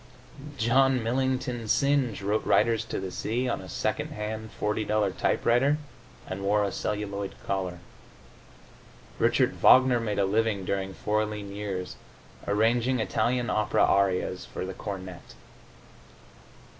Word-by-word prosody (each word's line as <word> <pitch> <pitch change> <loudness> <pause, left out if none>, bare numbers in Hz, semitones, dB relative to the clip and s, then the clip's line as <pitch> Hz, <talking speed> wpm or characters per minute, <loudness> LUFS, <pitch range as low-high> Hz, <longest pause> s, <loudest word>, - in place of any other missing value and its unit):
John 130 +2 +3
Millington 125 -1 -1
Synge 135 -4 +1
wrote 105 +2 0
"Riders 115 -1 +2
to - - -4
the 95 -1 -5
Sea" 120 +7 -2
on 120 - -2
a - - -10
second - - -2
hand 110 +1 -5
$40 105 0 0
typewriter, 135 +5 +2 0.5
and 95 +1 -6
wore 105 +1 +2
a 100 - -1
celluloid 100 0 -3
collar. 95 -2 -2 1.4
Richard - - +3
Wagner 130 -1 +6
made 105 -3 -2
a 100 - +3
living, 105 -1 0
during 95 0 -2
four 105 +1 0
lean 105 -2 -6
years, 95 -3 -4 0.5
arranging 115 +4 +2
Italian 120 +3 0
opera 105 +1 +2
arias 95 -2 +1
for - - -6
the 95 - -5
cornet. 95 -2 -8
105 Hz, 125 wpm, -27 LUFS, 100-120 Hz, 1.4 s, Wagner